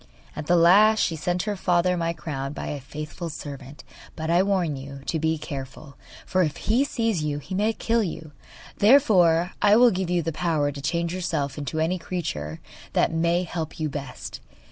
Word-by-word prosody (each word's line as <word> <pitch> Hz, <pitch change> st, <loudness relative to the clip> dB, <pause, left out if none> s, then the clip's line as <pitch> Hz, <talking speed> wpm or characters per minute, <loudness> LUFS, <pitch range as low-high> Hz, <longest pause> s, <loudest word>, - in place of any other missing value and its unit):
At 150 Hz, -, -6 dB
the 175 Hz, -, +4 dB
last 205 Hz, +6 st, +6 dB
she 165 Hz, -, +1 dB
sent 175 Hz, +3 st, -1 dB
her 210 Hz, -1 st, -2 dB
father 180 Hz, -1 st, +2 dB
my 165 Hz, -1 st, -1 dB
crown 145 Hz, -4 st, -5 dB
by -, -, -5 dB
a 145 Hz, -, -4 dB
faithful 150 Hz, +5 st, -7 dB
servant. 140 Hz, -2 st, -9 dB, 0.3 s
But 160 Hz, 0 st, -3 dB
I 175 Hz, +2 st, +5 dB
warn 190 Hz, -6 st, +1 dB
you 135 Hz, 0 st, -8 dB
to 160 Hz, -, -1 dB
be 160 Hz, +1 st, +1 dB
careful, 140 Hz, 0 st, -8 dB, 0.3 s
for 185 Hz, -, +1 dB
if 155 Hz, -4 st, 0 dB
he 235 Hz, +5 st, +2 dB
sees 230 Hz, -, -1 dB
you 150 Hz, -1 st, -1 dB
he 150 Hz, +6 st, -8 dB
may 210 Hz, +4 st, +2 dB
kill 230 Hz, +1 st, 0 dB
you. 160 Hz, -5 st, -5 dB, 0.5 s
Therefore 190 Hz, -, +5 dB
I 205 Hz, 0 st, +6 dB
will 240 Hz, +1 st, +6 dB
give 185 Hz, -1 st, -2 dB
you 175 Hz, -1 st, +1 dB
the 165 Hz, -, -2 dB
power 155 Hz, -3 st, 0 dB
to 140 Hz, 0 st, -8 dB
change 170 Hz, +3 st, -1 dB
yourself 170 Hz, -6 st, -2 dB
into 145 Hz, 0 st, -4 dB
any 170 Hz, +3 st, 0 dB
creature 80 Hz, -, -4 dB, 0.3 s
that -, -, +2 dB
may 170 Hz, +2 st, +1 dB
help 160 Hz, -2 st, -5 dB
you 155 Hz, -1 st, -1 dB
best. 140 Hz, -2 st, -7 dB
165 Hz, 190 wpm, -25 LUFS, 150-185 Hz, 0.5 s, last